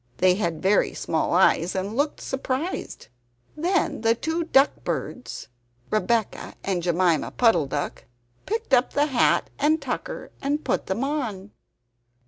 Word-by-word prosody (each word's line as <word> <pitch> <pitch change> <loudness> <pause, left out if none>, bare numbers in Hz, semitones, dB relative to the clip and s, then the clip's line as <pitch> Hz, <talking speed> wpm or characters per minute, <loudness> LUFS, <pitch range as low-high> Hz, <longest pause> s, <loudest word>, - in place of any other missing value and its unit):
They 185 0 +4
had 170 -5 -2
very 195 +2 +3
small 160 - -1
eyes 180 0 +3
and 195 +3 -2
looked 290 +3 0
surprised. 265 - -4 0.5
Then 345 - 0
the 225 0 +3
two 320 +7 -2
duck 275 -3 +3
birds, 250 - -4 0.4
Rebeccah 220 0 0
and 190 -3 -1
Jemima 175 -2 +2
Puddle 225 - +3
duck, 145 +1 -4 0.4
picked 445 -6 -3
up 250 0 +4
the 290 - +3
hat 265 -5 +2
and 310 +3 +3
tucker 285 - -5
and 290 +2 -1
put - - -1
them 205 +7 -1
on. 230 -9 -3
235 Hz, 135 wpm, -24 LUFS, 185-290 Hz, 0.5 s, They